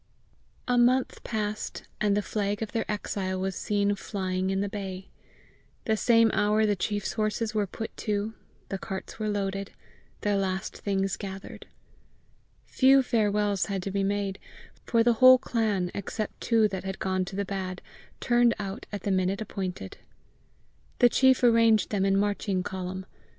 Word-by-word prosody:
A 245 -1 +3
month 250 +2 +2
passed, 215 -1 -3 0.2
and 205 -1 +2
the 205 - 0
flag 205 0 -2
of 220 - -6
their 225 -2 -2
exile 190 -2 -3
was 190 0 -2
seen 205 -1 +1
flying 190 -2 -2
in 195 0 0
the 200 - 0
bay. 195 -2 -6 0.8
The 220 - +2
same 230 0 +4
hour 210 +1 +3
the 205 -1 +2
chief's 205 +1 -2
horses 215 0 -1
were 210 -2 0
put 220 +4 -7
to, 210 0 -2 0.4
the 195 - -3
carts 190 +2 -6
were 215 -1 -1
loaded, 195 -1 -2 0.5
their 205 -2 +1
last 190 -1 -2
things 195 -1 -1
gathered. 195 -1 -8 1.0
Few 270 0 +5
farewells 210 -4 +1
had 195 -3 -3
to 195 - -3
be 195 0 0
made, 200 -1 -1 0.5
for 230 -1 +3
the 240 0 +4
whole 255 0 +10
clan, 215 -8 -1
except 210 +2 -5
two 225 -2 +3
that 190 -2 -5
had 190 0 -4
gone 185 -1 0
to 190 - -8
the 200 0 -1
bad, 185 -2 -4 0.4
turned 240 -1 +3
out 195 -1 -6
at 205 - -5
the 200 - 0
minute 185 +1 +1
appointed. 185 - -5 1.0
The 245 - +6
chief 260 +1 +4
arranged 230 -2 +4
them 195 -2 +1
in 195 0 +3
marching 200 -2 0
column. 185 0 -5
205 Hz, 160 wpm, -27 LUFS, 195-220 Hz, 1.0 s, whole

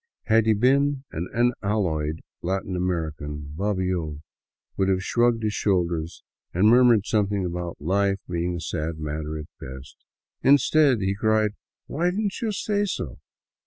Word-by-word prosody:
Had 110 0 +3
he 110 - +5
been 135 +4 +2
an 85 +3 -4
unalloyed 100 -10 0 0.2
Latin 95 +1 -2
American, 75 -5 -3
Bobbio 90 -6 -2 0.5
would 95 0 +1
have 95 -1 +1
shrugged 120 +2 +2
his 105 -1 0
shoulders 85 -6 -1 0.3
and 95 +4 +4
murmured 120 -4 +5
something 100 -3 +1
about 85 -1 -4
life 100 +5 +1
being 85 0 -2
a - - -4
sad 80 -1 -3
matter 75 0 -4
at 75 - -6
best. 65 0 -9 0.5
Instead, 140 -2 +4
he 95 0 +1
cried 110 +1 +2 0.2
" - - -69
Why 170 +5 0
did 185 +3 -2
n't 205 +3 -2
you 225 -2 0
say 205 0 0
so 125 - -4
95 Hz, 150 wpm, -25 LUFS, 85-115 Hz, 0.5 s, he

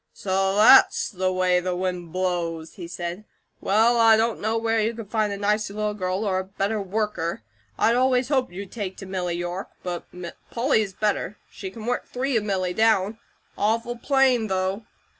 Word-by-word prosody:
"So 195 0 0
THAT'S 225 +6 +6
the 185 -2 -1
way 185 -1 +2
the 180 0 -2
wind 180 -2 -3
blows!" 170 -3 -2
he 175 -5 -8
said. 175 +2 -5 0.4
"Well, 225 +4 +3
I 225 -1 +7
don't 225 +1 0
know 220 +2 0
where 225 0 +1
you 220 +2 0
could 220 -3 -9
find 215 -2 +1
a 200 - -3
nicer 205 0 0
little 210 0 -1
girl 185 +1 -2
or 190 -2 +1
a - - -2
better 200 +2 -2
worker. 195 - -2 0.3
I'd 230 - +3
always 255 0 +2
hoped 260 -8 +1
you'd 190 +2 -8
take 200 -5 -5
to 195 - -8
Milly 180 -2 -2
York; 175 +2 -4
but 175 -1 -5 0.4
Polly 235 -2 +2
is 200 -3 -4
better; 210 0 -1
she 190 - -7
can 215 +3 -9
work 245 +1 -2
three 265 +1 -2
of 220 - +2
Milly 185 -3 -1
down. 220 0 +2 0.4
Awful 230 +3 0
plain, 255 -2 +2
though!" 190 +2 -2
205 Hz, 185 wpm, -24 LUFS, 185-225 Hz, 0.4 s, I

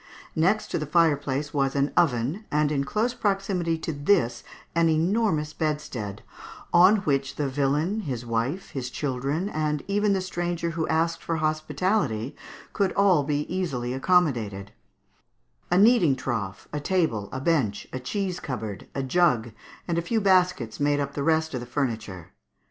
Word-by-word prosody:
Next 190 +7 +1
to - - 0
the 150 - -4
fireplace 145 -3 +1
was 135 -2 +1
an 140 +1 +1
oven, 145 - +1
and 150 0 +2
in 140 -2 0
close 215 - 0
proximity 195 -6 0
to 160 0 -4
this 140 -6 +1 0.3
an 170 -1 +3
enormous 160 -2 +1
bedstead, 150 -10 -3 0.5
on 185 +4 +7
which 135 -2 0
the 145 - -1
villain, 145 +9 0
his 130 - -4
wife, 120 +10 -2
his 130 -3 -4
children, 140 +6 -2
and 155 -5 -1
even 205 0 +2
the 195 - +1
stranger 175 -2 -2
who 165 -1 -2
asked 165 +1 0
for 165 - -2
hospitality, 155 - -1 0.4
could 195 -2 +1
all 195 -6 +4
be 145 +1 0
easily 140 -9 -2
accommodated; 125 - +1 1.0
a 175 - +3
kneading 195 - +5
trough, 100 -7 -4
a 150 - -1
table, 145 - 0
a 130 - -4
bench, 135 -9 0
a 130 - -3
cheese 185 +7 -3
cupboard, 110 -7 -5
a 135 - -1
jug, 130 -6 +2 0.4
and 170 -1 0
a - - 0
few 225 +7 0
baskets 180 - +2
made 145 0 +2
up 140 0 -2
the 140 - -3
rest 160 +1 +1
of 130 - -2
the 120 - -8
furniture. 110 - -3
150 Hz, 160 wpm, -26 LUFS, 130-175 Hz, 1.0 s, on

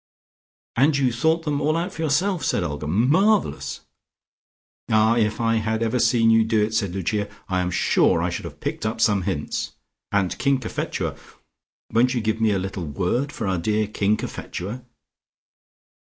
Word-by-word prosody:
"And 140 +4 +3
you 130 -3 +1
thought 160 +7 +1
them 150 -2 -1
all 155 +2 +1
out 175 +3 -3
for 160 - -6
yourself?" 165 +4 +1
said 95 - +1
Olga. 75 -2 -4
"Marvellous!" 155 - +2 1.1
"Ah, 110 +1 +4
if 105 -2 +1
I 115 -1 +2
had 110 +1 -1
ever 115 +2 0
seen 115 -1 +4
you 115 0 +5
do 110 0 +1
it," 110 - -6
said 100 -4 -1
Lucia, 100 +2 -1 0.2
"I 95 -2 0
am 90 - -1
sure 90 - +2
I - - 0
should - - -5
have - - -9
picked - - -4
up 110 +1 -2
some 105 -3 +3
hints! - - -3 0.4
And 100 -3 +1
King 140 -1 +2
Cophetua! - - -3 0.8
Won't 125 +3 +3
you 120 - 0
give 110 +1 -1
me 110 - +4
a 100 - +1
little 95 -2 -4
word 100 - -1
for 115 - -5
our 95 -2 0
dear 105 +4 +1
King 105 0 0
Cophetua? 105 +8 -6
110 Hz, 175 wpm, -23 LUFS, 100-135 Hz, 1.1 s, you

